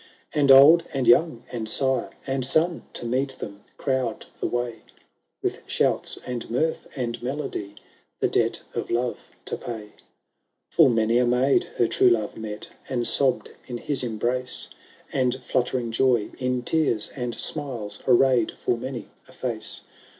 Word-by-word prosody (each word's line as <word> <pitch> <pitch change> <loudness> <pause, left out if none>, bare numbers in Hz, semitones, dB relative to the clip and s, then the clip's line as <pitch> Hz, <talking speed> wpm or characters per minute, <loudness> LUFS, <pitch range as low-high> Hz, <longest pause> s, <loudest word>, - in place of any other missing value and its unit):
v - - 0
And 140 -2 +6
old 150 +6 +9
and 135 -3 -1
young, 120 -1 +4
and 110 -3 -3
sire 130 +2 +1 0.2
and 135 -1 -1
son. 160 +6 +2
To - - -6
meet 130 +3 -1
them 100 0 -8
crowd 130 -2 -1
the - - 0
way, 120 -1 -2 0.7
With - - -1
shouts, - - 0
and 125 -2 -5
mirth, 155 +7 0
and 120 -2 -3
melody, 120 -6 -4 0.4
The - - +3
debt - - 0
of - - -3
love 120 +1 0 0.3
to - - -3
pay. 115 -3 -6
VI 105 - -16 0.8
Full 160 -5 +6
many 115 0 +3
a 125 - +3
maid 125 +3 +3
her 120 - +4
true 125 - +4
love 110 -3 0
met, 105 -1 -6 0.2
And 120 -2 0
sobbed 135 +1 +1 0.2
in 120 - -4
his 135 +1 -1
embrace, 120 +2 -1 0.4
And 130 -2 +2
fluttering 125 -1 0
joy 120 -2 +2
in 125 -1 -1
tears 140 -8 +1
and 120 -3 -3
smiles 130 -9 -3
Arrayed 125 -2 +4
full 120 - 0
many 125 -1 -6 0.2
a - - -16
face. - - -3
125 Hz, 155 wpm, -25 LUFS, 115-135 Hz, 0.8 s, old